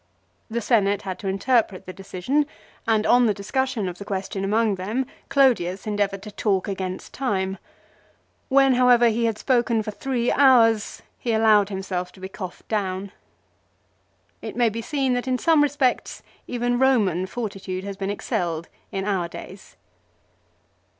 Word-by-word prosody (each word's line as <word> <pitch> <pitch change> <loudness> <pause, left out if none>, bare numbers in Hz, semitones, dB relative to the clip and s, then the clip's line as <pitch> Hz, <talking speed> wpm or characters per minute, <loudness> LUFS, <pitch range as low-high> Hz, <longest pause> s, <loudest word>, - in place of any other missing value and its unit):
The 235 +1 -2
Senate 205 -3 +2
had 190 -2 -5
to 200 - -5
interpret 195 0 +1
the 185 - -7
decision, 195 +11 -1 0.4
and 220 -1 +2
on 245 -1 +5
the 210 - +1
discussion 250 +1 -1
of 175 -1 -6
the - - -6
question 195 -1 -4
among 215 +2 +2
them 210 +8 -2 0.2
Clodius 210 -10 +2
endeavoured 205 -2 -1
to 210 - -8
talk 200 -2 0
against 190 -2 -5
time. 195 -7 -1 0.9
When, 270 -1 +5
however, 245 -1 +5
he 230 +1 0
had 225 -2 0
spoken 235 -3 +1
for 215 - -4
three 245 +2 -1
hours 235 -6 +4 0.2
he 235 - -1
allowed 215 -2 +4
himself 185 -2 -4
to - - -16
be 190 0 -7
coughed 185 -2 -8
down. 195 -2 -2 1.3
It - - -6
may 240 -2 +3
be 225 +2 -5
seen 270 0 0
that 245 +1 -2
in 255 -1 +1
some 320 +2 +4
respects 280 -3 0 0.2
even 245 0 -1
Eoman 200 -9 +2
fortitude 195 -5 -5
has 200 0 -5
been 195 0 -3
excelled 170 -4 -2 0.2
in 195 0 -3
our 190 -4 0
days. 190 +3 -11
210 Hz, 155 wpm, -24 LUFS, 190-245 Hz, 1.3 s, on